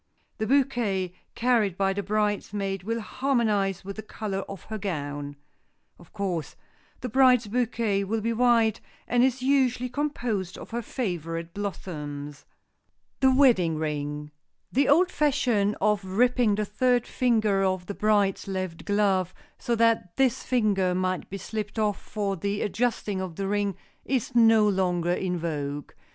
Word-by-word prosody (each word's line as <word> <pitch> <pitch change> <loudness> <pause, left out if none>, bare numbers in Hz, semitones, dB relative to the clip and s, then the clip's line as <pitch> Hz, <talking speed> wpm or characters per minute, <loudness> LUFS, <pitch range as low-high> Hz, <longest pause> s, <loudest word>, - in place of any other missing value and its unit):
The 220 - -1
bouquet 235 -9 +1 0.2
carried 230 -6 +2
by 195 -1 +2
the 200 - -2
bridesmaid 205 -1 -1
will 230 +4 -2
harmonize 210 -7 0
with 200 +1 -6
the - - -4
color 210 -2 -4
of 195 -4 -8
her 220 -1 -6
gown. 145 -6 -4 0.6
Of 175 - -17
course, 185 -6 -3 0.5
the 250 - -3
bride's 250 -1 +5
bouquet 225 -3 0
will 220 +3 -1
be 230 +2 0
white, 230 -2 +3 0.3
and 245 0 +3
is 260 0 +1
usually 255 -2 +2
composed 240 -9 -2
of - - -10
her 235 +1 -2
favorite 170 - -4
blossoms. 150 -8 -6 0.8
[Sidenote: 265 -1 +5
THE - - +2
WEDDING 185 - +4
RING] 150 -1 -3 0.4
The 275 +2 +2
old 355 +6 +5
fashion 245 -9 +1
of 210 0 +2
ripping 230 +3 +2
the 210 0 -1
third 245 +4 +1
finger 220 -6 +1
of 185 -1 0
the 200 - -5
bride's 205 -2 +1
left 185 -2 -2
hand - - -12
glove, 195 -3 +1 0.2
so 240 -2 0
that 225 -6 +1
this 265 -1 +2
finger 200 -7 +1
might 185 0 -1
be 195 - -5
slipped 210 +2 -5
off 210 -2 0
for 200 -2 -2
the 200 +3 -2
adjusting 210 -3 -1
of 185 -3 -5
the 195 +2 -3
ring, 205 -1 0 0.3
is 260 -1 -1
no 225 -2 +6
longer 180 -3 +1
in 180 0 -1
vogue. 145 -4 -4
205 Hz, 155 wpm, -26 LUFS, 185-235 Hz, 0.8 s, no